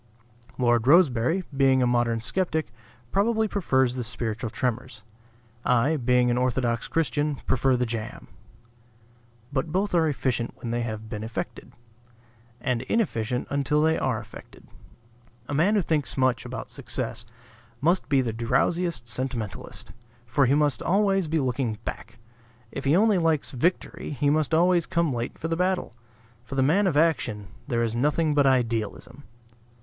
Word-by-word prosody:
Lord 120 -1 +2
Rosebery, 160 +1 +4
being 135 -1 +4
a - - +3
modern 120 -2 +1
skeptic, 160 -2 -2 0.4
probably 220 +2 +2
prefers 130 -11 +1
the 125 -1 -3
spiritual 115 -1 -3
tremors. 125 0 -3 0.6
I, 125 +6 +2
being 125 -2 +2
an 120 - +1
orthodox 125 -2 0
Christian, 150 -2 0
prefer 130 0 +2
the 125 - 0
jam. 115 -2 -6 1.3
But 150 +3 -1
both 195 +4 0
are 165 -2 +3
efficient 125 -3 -2
when 115 - -6
they 120 0 -1
have 110 -2 -5
been 105 -1 -5
effected; 115 +1 -6 0.9
and 120 -1 -1
inefficient 125 - -1
until 140 +1 +1
they 160 0 +3
are 125 -7 -1
effected. 110 0 -13 0.8
A - - -4
man 175 +9 +3
who 200 - +2
thinks 150 -6 -1
much 130 -2 +1
about - - -6
success - - -3 0.6
must 170 +6 +1
be 140 -2 +4
the 115 -3 -2
drowsiest 125 +5 0
sentimentalist; 120 -3 -5 0.3
for 130 +3 +2
he 135 - +3
must 145 -5 +2
be - - -8
always 195 -2 +2
looking 130 -7 -1
back. 120 - -7 0.5
If 140 - -6
he 140 +4 +4
only 210 0 +4
likes 160 -4 +1
victory 160 +8 -1
he 145 +1 +3
must 155 0 +1
always 175 0 +3
come 170 -4 +1
late 120 0 -4
for 160 - -4
the 165 - -1
battle. 180 -6 -1 0.5
For 130 +3 -7
the 135 - +3
man 185 +9 +3
of 155 -6 +1
action 125 - +1 0.2
there 120 -3 0
is 115 -1 -1
nothing 150 +5 +1
but 145 -1 +4
idealism. 120 +2 -1
130 Hz, 155 wpm, -26 LUFS, 120-160 Hz, 1.3 s, Rosebery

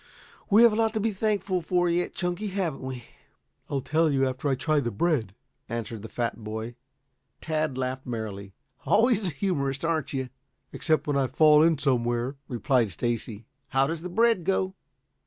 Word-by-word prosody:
We 215 +3 +7
have 235 -2 +7
a - - 0
lot 225 0 +1
to - - +1
be 220 +1 0
thankful 200 -3 0
for 175 +2 +1
yet, 175 +1 0
Chunky. 180 +4 -2
Haven't 185 -7 -2
we?" 130 -2 -6 0.7
"I'll 140 -2 -1
tell 160 +4 +2
you 135 -2 +2
after 130 +3 -2
I 135 - +2
try 150 +3 +1
the 120 -4 -1
bread," 115 - 0 0.3
answered 115 -2 -4
the 110 - -8
fat 120 -1 -3
boy. 110 +2 -5 0.7
Tad 155 -4 -1
laughed 130 0 -3
merrily. 100 -4 -5 0.3
"Always 220 -2 +3
a - - +1
humorist, 140 -4 -1
aren't 160 -3 -1
you?" 130 -2 -3 0.4
"Except 160 -2 +1
when 145 -1 0
I 135 -1 +2
fall 150 +3 +5
in 165 -1 +4
somewhere," 125 -1 0
replied 125 -2 +1
Stacy. 115 +2 -3 0.2
"How 135 0 +2
does 160 +3 -3
the 180 - -5
bread 225 0 +3
go?" 190 +1 0
145 Hz, 175 wpm, -27 LUFS, 120-180 Hz, 0.7 s, We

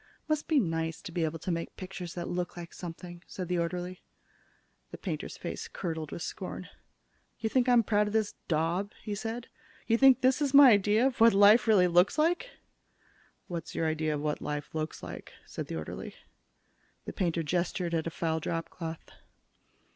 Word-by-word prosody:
"Must 310 -1 0
be 310 -3 +4
nice 165 -5 -1
to 190 - -8
be 170 -1 0
able 160 +1 -3
to 170 +3 -4
make 165 0 -4
pictures 185 -2 -7
that 175 -1 -4
look 175 0 -3
like 170 -1 -8
something," 175 0 -8
said 185 -2 -5
the 180 0 0
orderly. 180 +2 -3 0.9
The - - -8
painter's - - -5
face - - -5
curdled 160 -4 -4
with 170 - -5
scorn. 185 -1 -6 0.7
"You 220 - -1
think 255 -1 +3
I'm 240 -2 +6
proud 210 0 +2
of 210 - -4
this 220 -2 +1
daub?" 170 +5 0
he 210 - -3
said. 225 +3 -4 0.4
"You 230 0 +2
think 270 -2 +7
this 260 +3 +3
is 280 -1 +1
my 275 -3 +10
idea 210 +3 +4
of 260 -4 0
what 230 -3 +7
life 210 +3 +7
really 195 -5 +5
looks 175 - +4
like?" 345 +10 +1 1.0
"What's 170 -2 -6
your 165 - 0
idea 155 -1 0
of 145 - -4
what 150 0 -2
life 150 -1 -4
looks 155 -1 -4
like?" - - -8
said - - -6
the - - -5
orderly. 80 -1 -6 0.9
The - - -6
painter 170 -3 0
gestured 175 +1 -1
at 165 0 0
a - - 0
foul 160 -1 -1
dropcloth. 165 0 -5
180 Hz, 185 wpm, -30 LUFS, 165-220 Hz, 1.0 s, my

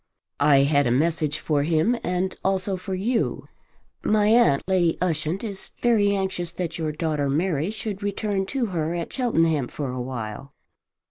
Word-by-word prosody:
"I 140 -2 +5
had 145 -1 +3
a - - +1
message 155 +2 +1
for 150 -2 0
him 165 +10 +2
and 180 +1 -1
also 190 0 0
for 185 +1 -4
you. 225 +5 -1 0.5
My 210 -1 +3
aunt, 215 - +4
Lady 180 -3 +2
Ushant, 170 +1 -1
is 200 -4 -6
very 210 -4 +3
anxious 190 -3 -2
that 175 -2 -4
your 155 -1 -1
daughter 150 -2 -1
Mary 160 +2 0
should 215 -2 -5
return 200 -1 -1
to 265 0 -1
her 165 0 -1
at 170 -1 -4
Cheltenham 165 - +1
for 140 -1 -4
a 125 0 -4
while." 125 +1 -6
170 Hz, 160 wpm, -24 LUFS, 150-200 Hz, 0.5 s, I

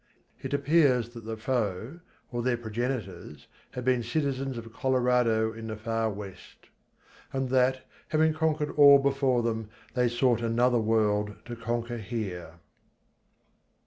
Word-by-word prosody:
It - - -5
appears 140 -5 +3
that 115 -2 -11
the 110 0 -5
foe, 115 - -2 0.3
or 120 -1 -2
their 120 0 +1
progenitors, 110 - -5 0.3
had 125 -1 -5
been 130 -1 +2
citizens 135 +1 -2
of 115 -1 -9
Colordo 125 -4 +2
in 115 0 -8
the 110 - -4
far 115 0 -1
West. 100 -2 -10 0.6
And 135 -1 -2
that, 130 0 +2 0.2
having 155 0 +2
conquered 155 -2 0
all 140 -1 +9
before 135 -3 +1
them, 110 -2 -2 0.2
they 125 -1 +2
sought 120 -1 +2
another 120 +1 +2
World 105 -2 +1
to 120 - -6
conquer 120 +1 -3
here. 95 -6 -5
120 Hz, 135 wpm, -28 LUFS, 110-130 Hz, 0.6 s, all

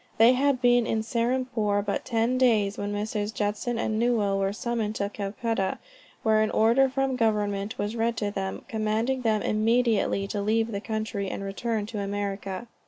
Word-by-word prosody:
They 230 +3 +7
had 260 -1 +1
been 245 -1 +4
in 220 -1 0
Serampore 235 -3 0
but 200 - -2
ten 235 +1 +1
days, 215 -6 +3
when 205 0 -3
Messrs. 210 0 -2
Judson 215 +3 -2
and 220 -1 -1
Newell 215 -5 +2
were 195 0 +1
summoned 220 -1 -2
to 200 -1 -1
Calcutta, 205 0 -2 0.5
where 220 -1 +4
an 215 - +2
order 235 +5 +4
from 270 0 0
government 210 -3 0
was 205 +2 -2
read 230 0 0
to 205 -1 -1
them, 190 -1 -4
commanding 220 +4 -1
them 220 -3 +1
immediately 225 -2 +2
to 205 - -2
leave 225 +2 +1
the 200 -1 -3
country, 215 -3 -3
and 195 - -5
return 210 +2 -2
to 215 -1 -5
America. 200 0 -3
220 Hz, 170 wpm, -26 LUFS, 205-235 Hz, 0.5 s, They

